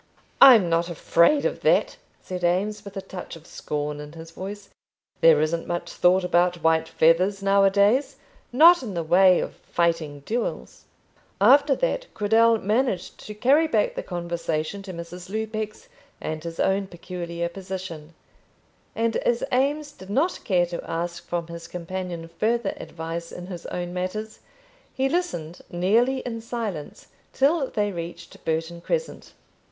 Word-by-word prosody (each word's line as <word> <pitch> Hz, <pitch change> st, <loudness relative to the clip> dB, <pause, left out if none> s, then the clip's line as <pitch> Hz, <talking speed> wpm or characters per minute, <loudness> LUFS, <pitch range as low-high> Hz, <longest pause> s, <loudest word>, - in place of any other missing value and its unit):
"I'm 230 Hz, -9 st, +9 dB
not 170 Hz, +1 st, +1 dB
afraid 170 Hz, -, +3 dB
of -, -, -1 dB
that," -, -, +2 dB, 0.3 s
said 180 Hz, -1 st, -6 dB
Eames, 200 Hz, +4 st, 0 dB
with 200 Hz, -1 st, -9 dB
a 195 Hz, -, -4 dB
touch 180 Hz, -2 st, -8 dB
of 165 Hz, -1 st, -14 dB
scorn 150 Hz, -2 st, -4 dB
in 150 Hz, +1 st, -9 dB
his 165 Hz, 0 st, -10 dB
voice. 200 Hz, +4 st, -8 dB, 0.5 s
"There 160 Hz, -2 st, +6 dB
isn't 160 Hz, +2 st, -1 dB
much 175 Hz, 0 st, -3 dB
thought 180 Hz, +1 st, +3 dB
about 175 Hz, -1 st, +1 dB
white 160 Hz, 0 st, +3 dB
feathers 185 Hz, +5 st, +3 dB
now 195 Hz, 0 st, +4 dB
a 195 Hz, -, +6 dB
days, 205 Hz, +8 st, +2 dB, 0.4 s
not 330 Hz, +7 st, +7 dB
in 215 Hz, -7 st, -6 dB
the 170 Hz, -, -1 dB
way 180 Hz, +2 st, +5 dB
of -, -, -5 dB
fighting 165 Hz, -4 st, -1 dB
duels." 230 Hz, -, -4 dB, 0.5 s
After 275 Hz, +7 st, +6 dB
that, -, -, -2 dB
Cradell 225 Hz, +2 st, +4 dB
managed 215 Hz, -2 st, -1 dB
to 210 Hz, -, -7 dB
carry 280 Hz, +9 st, +4 dB
back -, -, +1 dB
the -, -, -4 dB
conversation 170 Hz, 0 st, -3 dB
to 195 Hz, -1 st, -8 dB
Mrs. 175 Hz, +1 st, -9 dB
Lupex 215 Hz, 0 st, -4 dB, 0.3 s
and 155 Hz, 0 st, -5 dB
his 165 Hz, -1 st, -7 dB
own 195 Hz, 0 st, +1 dB
peculiar 170 Hz, -1 st, -5 dB
position, 180 Hz, -4 st, -7 dB, 0.8 s
and 230 Hz, 0 st, 0 dB
as 240 Hz, 0 st, 0 dB
Eames 285 Hz, +3 st, +1 dB
did 190 Hz, -9 st, -14 dB
not 285 Hz, -, +1 dB
care 180 Hz, -4 st, +2 dB
to 170 Hz, 0 st, -6 dB
ask 170 Hz, +1 st, -3 dB
from 170 Hz, -1 st, -2 dB
his 170 Hz, 0 st, -9 dB
companion 180 Hz, -1 st, -5 dB
further 220 Hz, +5 st, -1 dB
advice 165 Hz, +1 st, -6 dB
in 180 Hz, -, -8 dB
his 180 Hz, -2 st, -8 dB
own 175 Hz, 0 st, -4 dB
matters, 215 Hz, +4 st, -4 dB, 0.6 s
he 265 Hz, 0 st, +1 dB
listened 270 Hz, -, -3 dB
nearly 225 Hz, +9 st, +2 dB
in 230 Hz, -2 st, -5 dB
silence 225 Hz, -10 st, -6 dB, 0.2 s
till 280 Hz, +1 st, +2 dB
they 205 Hz, -1 st, -1 dB
reached 170 Hz, -1 st, -8 dB
Burton 165 Hz, +1 st, -2 dB
Crescent. 485 Hz, -, -3 dB
185 Hz, 155 wpm, -24 LUFS, 170-225 Hz, 0.8 s, I'm